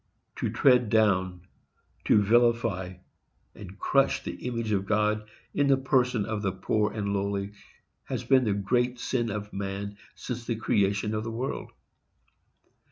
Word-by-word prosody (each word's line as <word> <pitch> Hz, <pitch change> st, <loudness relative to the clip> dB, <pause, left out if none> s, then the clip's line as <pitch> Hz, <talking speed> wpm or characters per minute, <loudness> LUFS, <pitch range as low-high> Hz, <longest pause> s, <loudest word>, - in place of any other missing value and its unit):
To -, -, -1 dB
tread 125 Hz, -4 st, +4 dB
down, 95 Hz, -5 st, +2 dB, 0.6 s
to -, -, +5 dB
vilify 110 Hz, -5 st, +2 dB, 0.6 s
and 100 Hz, -1 st, -11 dB
crush, 135 Hz, +4 st, +2 dB
the -, -, -6 dB
image 115 Hz, -3 st, -2 dB
of 100 Hz, -1 st, 0 dB
God, 105 Hz, 0 st, +1 dB, 0.2 s
in 145 Hz, -, +2 dB
the 135 Hz, -1 st, +5 dB
person 125 Hz, -5 st, +1 dB
of 110 Hz, -2 st, -3 dB
the 100 Hz, -2 st, 0 dB
poor 105 Hz, +3 st, 0 dB
and 100 Hz, -2 st, -2 dB
lowly, 100 Hz, 0 st, -2 dB, 0.5 s
has -, -, -4 dB
been 130 Hz, -2 st, +4 dB
the 105 Hz, -, +1 dB
great 120 Hz, +5 st, 0 dB
sin 120 Hz, -2 st, -1 dB
of 105 Hz, 0 st, -5 dB
man 100 Hz, +1 st, -4 dB, 0.2 s
since 125 Hz, -2 st, -5 dB
the 115 Hz, -, -1 dB
creation 105 Hz, -1 st, +1 dB
of 110 Hz, 0 st, -2 dB
the 115 Hz, -, -4 dB
world. 120 Hz, +4 st, -4 dB
105 Hz, 150 wpm, -27 LUFS, 100-120 Hz, 0.6 s, to